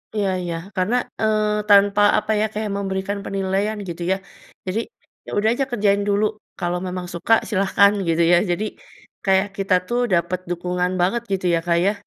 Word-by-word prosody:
Iya 200 -2 +1
iya, 170 -1 -3 0.2
karena, 190 +6 +1 0.3
eee, 210 -1 +1
tanpa 205 0 +5 0.2
apa - - -1
ya, - - +3
kayak 210 -1 -3
memberikan 195 +1 -2
penilaian 195 +2 -1
gitu 170 +1 -6
ya. - - +3 0.5
Jadi, 200 +5 -1 0.5
ya - - -10
udah 215 +2 +3
aja 270 +2 0
kerjain 205 -3 +2
dulu, 205 +1 +2 0.3
kalau 175 0 -1
memang 180 0 -4
suka, 175 +6 +1 0.2
silahkan 200 0 +4 0.2
gitu 165 +1 +2
ya. - - +7
Jadi 205 +5 -1 0.6
kayak 190 +1 +3
kita 195 -1 0
tuh 240 +1 0
dapat 175 +1 +1
dukungan 180 +1 -1
banget 230 +7 +1
gitu 190 -1 -1
ya, - - +1
Kak, 170 -1 +2
ya. 200 - +3
195 Hz, 175 wpm, -21 LUFS, 180-210 Hz, 0.6 s, ya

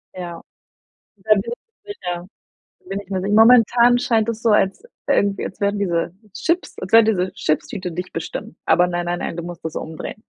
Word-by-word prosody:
Ja. 175 -2 -7 0.8
Da 215 - -2
bin 200 - +1 0.4
ich 410 - -6
sicher. 175 -1 -5 0.5
Da 375 - -32
bin 195 - -3
ich 200 - -15
mir 190 -1 -1
sicher. 200 +2 -1
Momentan 240 +2 +6
scheint 230 -3 +1
das 230 -1 -3
so 230 - +3
als 200 - +2 0.3
irgendwie 200 -1 +2
als - - -10
werden 200 0 +1
diese 170 -4 -1 0.2
Chips 340 +2 -1
als 185 - -7
wenn 225 0 +8
diese 190 -4 0
Chipstüte 180 +3 -2
dich 180 +2 -6
bestimmt. 165 0 -6
Aber 180 - +4
nein, 175 -1 -3
nein, 175 0 -2
nein, - - -4
du 170 - -4
musst 175 0 -9
das 160 - -4
umdrehen. 160 +6 -6
195 Hz, 195 wpm, -21 LUFS, 175-220 Hz, 0.8 s, wenn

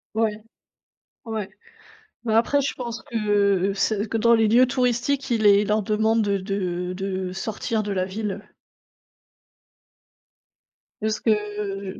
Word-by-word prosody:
Ouais. 215 -1 0 0.8
Ouais. 220 -4 -4 0.8
Heu, - - 0
après 260 +5 +3
je 275 - -1
pense 235 -2 -6
que 200 -3 +1
c 210 +1 0
que 225 - -2
dans 235 +1 +4
les 225 -1 +4
lieux 240 +4 +6
touristiques, 255 +2 0
il 225 -2 +1
est 200 0 +6
ils - - -3
leur 210 0 +2
demandent, 220 +2 +1
heu, 200 -1 +1
de 180 -2 -3
de 190 -1 -3
sortir 215 +3 -2
de 210 - -4
la 185 -1 0
ville. 200 +1 -4 2.6
Juste 215 0 -1
que 205 -3 -2
210 Hz, 135 wpm, -24 LUFS, 195-225 Hz, 2.6 s, lieux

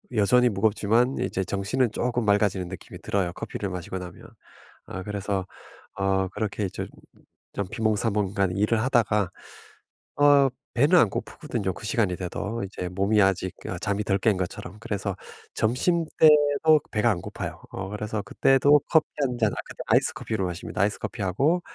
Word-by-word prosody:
여전히 125 +4 +4
무겁지만 110 +4 +2
이제 95 - -1
정신은 105 +5 0
쪼끔 120 0 -1
맑아지는 100 -3 +2
느낌이 95 - -9
들어요 95 -3 -1
커피를 100 +2 -5
마시고 90 0 -5
나면. 90 -1 -10 0.6
아 95 - -6
그래서 100 -2 -3 0.5
어 95 -1 +1
그렇게 105 +1 -3
이제 95 - -4 0.7
좀 100 -2 -3
비몽사몽간 105 -4 0
일을 110 +2 +2
하다가 105 -6 +2 0.9
어 145 -2 +6 0.3
배는 145 +9 +5
안 115 - +4
고프거든요 95 0 -4
그 110 - -10
시간이 100 -3 +1
돼도. 105 +4 -4
이제 90 -2 -5
몸이 100 +4 +2
아직 95 -1 +1
아 90 - -4
잠이 100 +2 -1
덜 100 -1 +1
깬 105 -1 +2
것처럼. 90 +1 -5
그래서 100 -3 -3 0.4
점심때도 150 +3 +4
배가 105 +2 +2
안 90 -5 -2
고파요. - - -6
어 95 - -5
그래서 105 +1 -3
그때도 135 +6 +4
커피 160 -2 +4
1 125 -3 0
잔 110 -3 +2
아 - - -5
그때 - - -8
아이스 - - +3
커피로 110 -4 -3
마십니다. 90 +1 -4
아이스 105 +1 +1
커피하고 130 - 0
105 Hz, 345 characters per minute, -25 LUFS, 95-120 Hz, 0.9 s, 어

